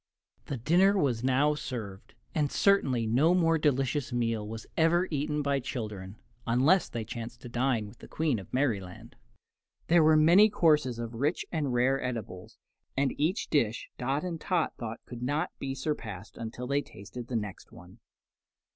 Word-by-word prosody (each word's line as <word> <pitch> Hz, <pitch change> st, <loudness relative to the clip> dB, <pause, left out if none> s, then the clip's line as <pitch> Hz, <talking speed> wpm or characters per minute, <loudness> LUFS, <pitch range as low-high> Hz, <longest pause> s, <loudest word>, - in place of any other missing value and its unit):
The 140 Hz, -, -3 dB
dinner 180 Hz, -, +4 dB
was 125 Hz, -9 st, +1 dB
now 135 Hz, +3 st, +3 dB
served, 115 Hz, -10 st, -7 dB, 0.2 s
and 150 Hz, -2 st, 0 dB
certainly 135 Hz, -, +3 dB
no 140 Hz, +11 st, +3 dB
more 165 Hz, -2 st, +3 dB
delicious 135 Hz, -2 st, 0 dB
meal 115 Hz, -3 st, -1 dB
was 110 Hz, 0 st, -7 dB
ever 175 Hz, +3 st, +3 dB
eaten 150 Hz, 0 st, -1 dB
by 140 Hz, -1 st, +1 dB
children, 105 Hz, -7 st, -5 dB, 0.3 s
unless 135 Hz, +11 st, +3 dB
they 115 Hz, -2 st, -4 dB
chanced 115 Hz, +2 st, -7 dB
to 120 Hz, -, -9 dB
dine 120 Hz, -3 st, 0 dB
with 115 Hz, -, -15 dB
the -, -, -12 dB
Queen 155 Hz, -8 st, 0 dB
of 95 Hz, -, -12 dB
Merryland. 105 Hz, -9 st, -2 dB, 0.7 s
There 170 Hz, 0 st, +6 dB
were 155 Hz, 0 st, +5 dB
many 175 Hz, +8 st, +7 dB
courses 150 Hz, -, +2 dB
of 115 Hz, 0 st, -5 dB
rich 140 Hz, +8 st, -1 dB
and 150 Hz, -5 st, -1 dB
rare 125 Hz, +3 st, +2 dB
edibles, 110 Hz, -7 st, -6 dB, 0.4 s
and 135 Hz, -1 st, +2 dB
each 165 Hz, +8 st, 0 dB
dish 120 Hz, -7 st, +1 dB
Dot 135 Hz, +5 st, -1 dB
and 170 Hz, -3 st, -4 dB
Tot 180 Hz, -4 st, 0 dB
thought 115 Hz, -1 st, -6 dB
could 120 Hz, -1 st, -9 dB
not 145 Hz, +7 st, -1 dB
be 135 Hz, -1 st, -3 dB
surpassed 115 Hz, -, -5 dB
until 115 Hz, +2 st, -6 dB
they 140 Hz, +3 st, +1 dB
tasted 115 Hz, +1 st, -10 dB
the 125 Hz, -, -4 dB
next 105 Hz, -4 st, -5 dB
one. 90 Hz, +6 st, -15 dB
130 Hz, 165 wpm, -29 LUFS, 115-155 Hz, 0.7 s, many